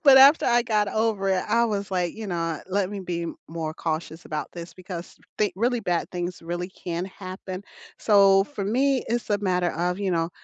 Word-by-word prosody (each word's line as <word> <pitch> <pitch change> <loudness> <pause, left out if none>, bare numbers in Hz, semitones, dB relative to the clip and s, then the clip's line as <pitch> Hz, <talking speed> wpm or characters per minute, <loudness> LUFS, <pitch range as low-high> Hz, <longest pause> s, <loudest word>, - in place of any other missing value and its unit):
But 275 -4 +8
after 275 +4 +8
I 240 -1 +4
got 215 -3 +1
over 215 -2 0
it, 190 -1 +2
I 235 0 +4
was, 200 -3 -1
like, 180 -2 0
"You 220 -1 -5
know, 165 -3 -1
let 195 0 0
me 205 - -4
be 170 -2 -3 0.2
more 160 -1 -3
cautious 160 +1 -4
about 155 -1 -4
this 170 0 -8
because 180 -1 -8 0.2
thin 210 -2 +2
really 240 +3 +1
bad 175 -5 -1
things 175 -1 -4
really 175 +2 -3
can 175 -2 -4
happen," 185 0 -7 0.4
so, 195 -2 +6
for 205 -4 -5
me, 260 +5 +2
it's 235 -1 -1
a 205 - +3
matter 180 -3 +1
of, 180 +3 -1
you 195 -2 0
know, 165 -1 0
190 Hz, 200 wpm, -25 LUFS, 175-215 Hz, 0.4 s, But